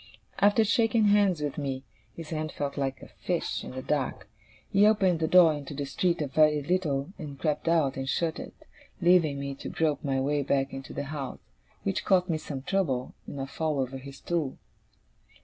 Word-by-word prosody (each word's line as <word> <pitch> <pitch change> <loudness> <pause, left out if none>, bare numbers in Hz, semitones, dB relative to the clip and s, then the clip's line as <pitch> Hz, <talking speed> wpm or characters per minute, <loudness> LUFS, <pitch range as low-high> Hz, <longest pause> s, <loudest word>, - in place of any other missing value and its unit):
After 205 +2 +5
shaking 225 0 +3
hands 200 -5 +3
with 145 0 -3
me 135 -2 -3 0.3
his 165 -2 -8
hand 155 -1 -2
felt 140 -1 -3
like 135 -1 -2
a - - -10
fish, - - -3
in - - -7
the 130 0 -6
dark 135 -9 -2 0.4
he 200 +1 +6
opened 190 -6 +3
the 160 - +1
door 170 -2 +7
into 145 -1 -6
the 140 0 -3
street 170 +4 0
a - - -2
very 150 +1 +3
little, 165 -2 -1
and 145 -4 -7
crept 150 +1 -1
out, 160 -6 +2
and 135 0 -3
shut 165 +1 0
it, - - -8 0.4
leaving 170 -5 +4
me 140 0 -3
to 135 - -7
grope 150 -3 0
my 135 -2 0
way 145 +2 +1
back 135 0 0
into 135 0 -7
the - - -3
house: 140 -2 -5 0.5
which 95 - -1
cost 185 -1 +3
me 160 -2 0
some 135 -3 -6
trouble 135 -9 -1
and 140 - -6
a 135 - -2
fall 155 +1 -2
over 135 0 -2
his 135 +1 -10
stool. 160 -5 -2
150 Hz, 200 wpm, -28 LUFS, 135-170 Hz, 0.5 s, door